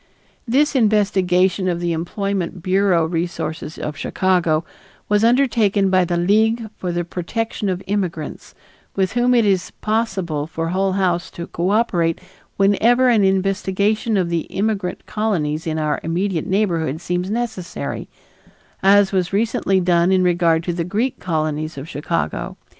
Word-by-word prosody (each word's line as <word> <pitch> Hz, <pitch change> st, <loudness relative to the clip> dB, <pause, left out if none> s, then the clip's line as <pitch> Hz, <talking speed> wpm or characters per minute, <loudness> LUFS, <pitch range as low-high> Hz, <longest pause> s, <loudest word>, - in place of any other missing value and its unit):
This 285 Hz, +5 st, +2 dB
investigation 190 Hz, -5 st, +2 dB
of 175 Hz, -2 st, 0 dB
the 175 Hz, -1 st, -1 dB
employment 180 Hz, +1 st, -3 dB
bureau 185 Hz, -3 st, +2 dB
resources 165 Hz, -1 st, -4 dB
of 150 Hz, -, -4 dB
Chicago 170 Hz, -1 st, +1 dB, 0.4 s
was 210 Hz, +1 st, +2 dB
undertaken 225 Hz, -6 st, +3 dB
by 185 Hz, -1 st, +4 dB
the 175 Hz, 0 st, -1 dB
League 220 Hz, +5 st, +2 dB
for 180 Hz, -, -4 dB
the 175 Hz, 0 st, -1 dB
Protection 200 Hz, +5 st, -3 dB
of 185 Hz, +1 st, -3 dB
Immigrants, 185 Hz, -6 st, -4 dB, 0.4 s
with 190 Hz, -1 st, 0 dB
whom 245 Hz, +1 st, +3 dB
it 235 Hz, -2 st, +4 dB
is 185 Hz, -3 st, +1 dB
possible 190 Hz, -9 st, -1 dB
for 165 Hz, 0 st, -3 dB
Hull 190 Hz, +2 st, 0 dB
House 180 Hz, -3 st, 0 dB
to 170 Hz, -, -7 dB
cooperate 175 Hz, -3 st, 0 dB, 0.4 s
whenever 230 Hz, +6 st, +4 dB
an 225 Hz, -4 st, +4 dB
investigation 195 Hz, +3 st, +1 dB
of 180 Hz, -3 st, 0 dB
the 170 Hz, -1 st, -2 dB
immigrant 200 Hz, -3 st, -2 dB
colonies 165 Hz, -8 st, -1 dB
in 160 Hz, 0 st, -1 dB
our 150 Hz, -1 st, 0 dB
immediate 170 Hz, +1 st, -1 dB
neighborhood 170 Hz, -7 st, 0 dB
seems 180 Hz, +2 st, -2 dB
necessary, 220 Hz, -5 st, -4 dB, 0.7 s
as 200 Hz, 0 st, +5 dB
was 185 Hz, -3 st, 0 dB
recently 200 Hz, -2 st, +1 dB
done 175 Hz, 0 st, +2 dB
in 185 Hz, -1 st, +3 dB
regard 170 Hz, -2 st, +2 dB
to 175 Hz, -, -2 dB
the 170 Hz, 0 st, -2 dB
Greek 215 Hz, +9 st, -2 dB
colonies 155 Hz, -3 st, -2 dB
of 135 Hz, +3 st, -7 dB
Chicago. 165 Hz, +1 st, -3 dB
185 Hz, 140 wpm, -20 LUFS, 170-205 Hz, 0.7 s, as